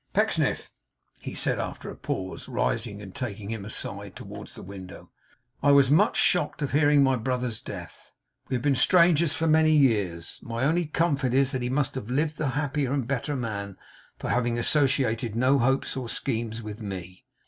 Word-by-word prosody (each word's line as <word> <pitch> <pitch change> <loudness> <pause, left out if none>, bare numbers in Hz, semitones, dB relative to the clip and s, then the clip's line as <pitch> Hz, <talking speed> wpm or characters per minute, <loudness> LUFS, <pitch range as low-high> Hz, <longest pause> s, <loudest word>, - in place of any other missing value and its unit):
'Pecksniff,' - - +1 0.5
he - - -7
said - - 0
after - - -5
a - - -9
pause, 95 +7 -5
rising 115 -4 -2
and 95 -2 -10
taking 105 -4 -5
him 110 -3 -4
aside 110 - -6
towards - - -9
the - - -9
window, 95 -1 -10 0.5
'I 145 0 +5
was 140 -1 +5
much 150 - +4
shocked 180 -3 +2
on 140 - -1
hearing 145 0 +4
of 140 - +6
my 135 -1 +3
brother's 125 -2 -2
death. - - -9 0.4
We - - 0
had 125 - -2
been 145 -1 +3
strangers 170 +2 +4
for 160 - -1
many 155 0 +4
years. 105 - +1
My 115 0 -3
only 165 +4 +2
comfort 145 -5 +1
is 135 0 +3
that 130 -3 -2
he 125 - -1
must 140 +1 0
have 125 -4 -6
lived 150 +4 0
the 155 - 0
happier 145 -2 -1
and 135 -4 -1
better 140 +2 -1
man 100 -6 -4 0.4
for - - -3
having 120 -1 +1
associated 120 -4 +1
no 130 +4 +3
hopes 135 +3 +1
or 130 -3 -4
schemes 115 0 -3
with 105 +1 -7
me. 90 -3 -7
130 Hz, 185 wpm, -26 LUFS, 110-145 Hz, 0.5 s, of